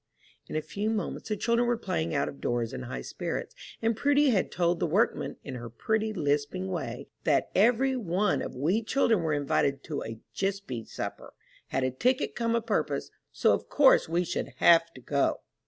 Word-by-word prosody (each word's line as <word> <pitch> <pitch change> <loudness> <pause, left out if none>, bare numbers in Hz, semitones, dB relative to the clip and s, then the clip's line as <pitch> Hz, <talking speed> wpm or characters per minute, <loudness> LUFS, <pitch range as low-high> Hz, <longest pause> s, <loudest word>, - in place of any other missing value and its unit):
In - - -6
a 155 - 0
few 205 +6 -2
moments 220 0 -3
the 215 - 0
children 235 +3 +2
were 240 -1 +2
playing 175 -7 -2
out 140 - +1
of 140 - -8
doors 120 0 -1
in 130 - -5
high 120 - -5
spirits, - - -4 0.3
and 225 0 +2
Prudy 285 +3 +3
had 200 -5 +1
told 175 -1 +1
the - - +1
workmen, 195 +9 +1
in 135 - -6
her 120 -2 -6
pretty, 220 - -1
lisping 145 - -1
way, - - -4 0.2
"that - - +2
every 245 +6 +3
one 205 -3 0
of - - -5
we 165 - +1
children 225 -3 +2
were 160 -2 0
invited 140 -1 0
to 150 -3 -4
a 115 0 -6 0.2
jispy 195 - -3
supper; - - -6 0.3
had 135 - -1
a 130 - +1
ticket 250 - +1
come 230 -1 0
a 230 - +1
purpose, 220 -3 -1 0.2
so - - +3
of - - -3
course 270 - +5
we 170 +2 +1
should 170 - -3
have 165 0 +5
to 130 - -11
go!" 140 +2 0
180 Hz, 195 wpm, -28 LUFS, 140-225 Hz, 0.3 s, course